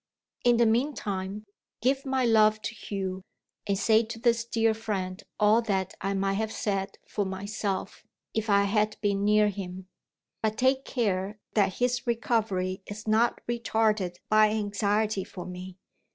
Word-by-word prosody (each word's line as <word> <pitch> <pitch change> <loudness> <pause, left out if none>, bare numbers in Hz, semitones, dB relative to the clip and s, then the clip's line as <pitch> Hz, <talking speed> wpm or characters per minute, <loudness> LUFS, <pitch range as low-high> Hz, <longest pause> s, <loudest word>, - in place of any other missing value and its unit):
In 240 -1 +5
the 235 - +5
meantime, 210 -5 -1 0.3
give 270 +3 +1
my 265 -1 +1
love 215 -2 +5
to - - -3
Hugh, 190 -3 -4 0.5
and 200 -1 +1
say 220 +2 +4
to 225 0 -6
this 230 0 +2
dear 225 -1 +2
friend 195 -4 -3 0.2
all 215 +2 +5
that 190 -4 -1
I 195 +1 -1
might 195 +1 0
have 220 0 -2
said 195 -3 -2
for 205 - -1
myself, 195 0 -4 0.3
if 220 0 -2
I 200 0 +5
had 210 +1 +1
been 200 -1 +1
near 210 0 +4
him. 190 -2 -7 0.5
But 220 0 0
take 260 +2 +2
care 205 -4 -1 0.2
that 200 -3 +2
his 245 0 0
recovery 215 -5 0
is 210 +1 -8
not 225 +2 +2
retarded 220 -5 +1
by 215 0 +5
anxiety 210 -1 0
for 185 -2 -9
me. 180 0 -8
210 Hz, 150 wpm, -28 LUFS, 195-225 Hz, 0.5 s, In